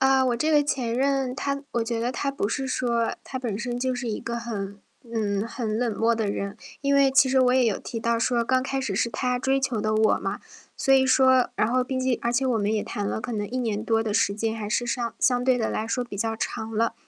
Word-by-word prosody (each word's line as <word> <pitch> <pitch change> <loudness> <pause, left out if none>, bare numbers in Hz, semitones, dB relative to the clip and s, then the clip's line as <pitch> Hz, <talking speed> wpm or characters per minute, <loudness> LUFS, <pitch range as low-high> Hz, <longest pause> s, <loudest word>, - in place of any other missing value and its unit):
啊， 265 0 +4
我 245 -2 +1
这 310 +6 0
个 295 - +5
前 255 -5 -1
任 270 0 +1
他 280 0 -2
我 235 - 0
觉 230 0 -2
得 240 +2 -1
他 275 +3 -2
不 275 -7 -2
是 265 +2 -2
说 235 -2 0
他 260 - -5
本 225 -6 -3
身 240 +1 -3
就 255 0 0
是 245 -2 -3
一 210 - -3
个 235 0 -4
很 205 -4 -5 0.3
嗯， 205 -1 0
很 225 -2 -3
冷 235 -3 0
漠 230 +1 +3
的 220 -2 -1
人。 200 0 -4 0.3
因 280 0 +1
为 275 -1 +5
其 270 0 +5
实 265 - +2
我 250 0 +4
也 255 -2 +4
有 215 - +1
提 230 -2 -5
到 230 +1 +1
说 235 0 +1
刚 255 +2 +2
开 270 0 -2
始 210 -8 -2
是 235 - +1
他 250 +3 -1
追 270 +1 +1
求 255 -5 -1
的 215 0 0
我 215 0 +4
嘛， - - -3 0.4
所 270 - +3
以 265 0 +5
说 260 -1 +4
然 215 - +1
后 255 0 +2
毕 260 +1 -3
竟 255 -1 +1
而 235 - 0
且 265 +2 +1
我 245 -3 +2
们 210 +1 0
也 210 - 0
谈 205 - -4
了 - - -2
可 250 - -5
能 205 -1 -2
1 255 - -3
年 220 -4 -1
多 225 -1 +2
的 215 -2 -2
时 200 - +2
间， 220 +1 -1
还 210 -2 -5
是 240 +3 0
上 235 -1 -2
相 245 -1 +3
对 255 -1 +3
地 225 - 0
来 220 - -2
说 245 +2 -1
比 205 -4 -8
较 225 +2 -1
长 220 0 -4
了。 230 +1 +1
240 Hz, 285 characters per minute, -25 LUFS, 225-260 Hz, 0.4 s, 个